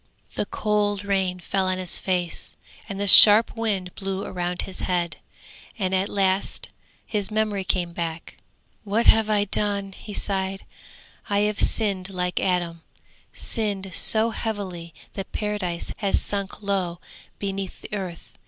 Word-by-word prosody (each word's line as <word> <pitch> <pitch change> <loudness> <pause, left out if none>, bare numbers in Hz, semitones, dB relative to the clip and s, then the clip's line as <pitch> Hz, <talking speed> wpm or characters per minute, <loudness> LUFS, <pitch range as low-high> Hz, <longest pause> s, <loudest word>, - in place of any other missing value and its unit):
The 205 - -2
cold 205 -1 0
rain 190 -2 0
fell 190 +1 -1
on 185 0 0
his 185 -2 -1
face, 180 -3 -1 0.3
and 195 -1 -5
the 205 - -1
sharp 210 +3 +9
wind 200 -6 -1
blew 195 0 -4
around 180 0 -3
his 190 - -8
head, 175 -2 -1 0.6
and 190 -3 -1
at 190 +1 +1
last 195 -1 0 0.4
his 205 -2 -2
memory 215 -2 0
came 180 -2 -1
back. 165 -1 -5 0.5
'What 215 +3 0
have 220 -1 +5
I 210 -1 +3
done?' 200 -1 -2
he 205 +1 -9
sighed. 195 -1 -1 0.6
'I 200 0 +2
have 210 0 0
sinned 195 -4 +1
like 180 -1 -1
Adam, 175 -3 -1 0.5
sinned 200 -4 -1
so 225 +1 +3
heavily 190 -7 -4 0.2
that 195 -1 -6
Paradise 205 -5 -3
has 200 -2 +1
sunk 200 0 -4
low 185 -4 -1 0.4
beneath 195 -1 -4
the - - -10
earth!' 185 -4 -6
195 Hz, 145 wpm, -24 LUFS, 185-205 Hz, 0.6 s, sharp